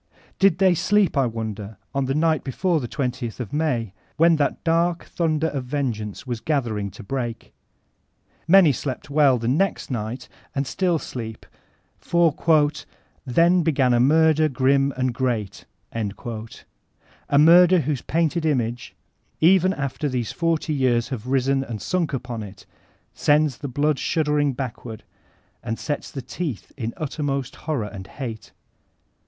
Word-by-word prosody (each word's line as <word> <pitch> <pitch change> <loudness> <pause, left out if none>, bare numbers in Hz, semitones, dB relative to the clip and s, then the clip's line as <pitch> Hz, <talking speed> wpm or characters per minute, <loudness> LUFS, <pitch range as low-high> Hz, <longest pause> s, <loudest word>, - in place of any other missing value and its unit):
Did 195 -3 +4
they 190 -1 +4
sleep, 200 +1 +2
I 135 -3 +3
wonder, 110 -2 -5 0.2
on 135 -1 0
the 135 +1 -1
night 160 0 +2
before 165 +5 0
the 125 - -4
JOth 125 -3 -3
of 120 -5 -6
May, 125 -10 -1 0.2
when 165 +1 +5
that 145 - -1
dark 170 +1 +1
thunder 160 -1 0
of 135 -3 -4
vengeance 125 -7 -3
was 120 -3 -3
gather 130 -6 -1
ing 100 0 -3
to 105 +4 -12
break? 120 0 -5 0.9
Many 180 -3 +7
slept 135 +2 -5
well 140 -3 +4
the 115 0 -3
next 160 +5 0
night, 115 +1 -4 0.3
and 140 0 0
still 180 +3 0
sleep; 115 -6 -7 0.5
for 170 -3 +2 0.9
''then 170 +7 +4
began 135 -6 +2
a 120 - +3
murder 155 +3 +4
grim 135 +1 +2
and 130 -1 0
great, 115 -6 -2
— - - -44
a 110 +5 -6
murder 175 +4 +7
whose 145 -2 -2
painted 165 +1 0
image, 120 -6 -1 0.4
even 185 +2 +5
after 140 -2 -3
these 125 -3 -2
forty 165 -2 -1
jrears 120 -2 +2
have 125 -3 -5
risen 135 +1 +1
and 115 -5 -6
sunk 170 - -1
upon 125 -3 -4
it, 100 -1 -10 0.5
sends 150 -3 +2
the 145 - -5
blood 145 +2 0
shuddering 150 -3 +1
backward, 120 -3 -6 0.6
and 115 - -4
sets 145 - -4
the 135 - -7
teeth 120 - -5
in 115 -4 -3
uttermost 140 -3 -3
horror 145 -9 -3
and 95 -2 -8
hate. 115 -5 -7
135 Hz, 150 wpm, -23 LUFS, 120-155 Hz, 0.9 s, Many